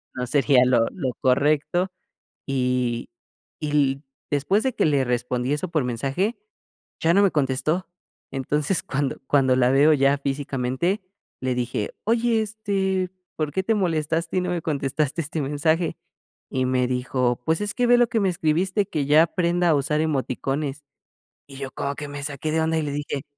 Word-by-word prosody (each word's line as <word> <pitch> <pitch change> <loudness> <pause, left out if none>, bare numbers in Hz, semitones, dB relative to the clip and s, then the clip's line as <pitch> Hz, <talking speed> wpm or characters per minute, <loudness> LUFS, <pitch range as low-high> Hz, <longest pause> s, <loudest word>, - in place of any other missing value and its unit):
no 125 -1 -3
sería 135 -1 +4
lo 120 -2 +4
lo 135 -9 -2
correcto". 150 +7 +2 0.6
Y 125 -3 0 0.5
y 150 - -2
l 140 -2 +2 0.3
después 150 +10 +1
de 260 -2 0
que - - +2
le 140 -3 +3
respondí 125 +2 -1
eso 150 +5 -2
por 155 -5 0
mensaje, 135 - -1 0.7
ya 165 - +4
no 200 - +5
me 195 - +4
contestó. 150 +5 0 0.4
Entonces, 150 +6 0
cuando 140 -1 -2
cuando 130 -3 +3
la 125 0 +4
veo 145 +3 +5
ya 140 0 +3
físicamente, 140 +6 -1 0.4
le 130 -1 +1
dije: 120 -4 -3
"Oye, 230 0 +2
este, 195 -3 -1 0.3
¿por 155 -2 -1
qué 190 - +1
te 225 +4 +2
molestaste 165 -2 0
y - - +3
no 180 - -2
me 175 -2 -1
contestaste 140 0 -1
este 155 0 -3
mensaje?". 160 +4 0 0.5
Y 130 -1 0
me 125 -1 +1
dijo: 125 -1 0
"Pues, 160 0 +2
es 210 0 -1
que 245 -1 +2
ve 245 0 +6
lo 240 - +4
que 230 - +1
me 195 - +2
escribiste, 180 +4 +1
que 150 -7 -2
ya 150 +3 +6
aprenda 175 +1 +1
a 160 - +5
usar 150 +2 0
emoticones". 140 -1 -2 0.6
Y 135 - -11
yo 135 -1 -5
como 140 0 -3
que 150 - -6
me 145 0 -6
saqué 145 +1 -3
de 160 +1 +1
onda 160 0 +1
y - - -1
le 145 - -3
dije 145 -1 -3
145 Hz, 175 wpm, -24 LUFS, 135-175 Hz, 0.7 s, ve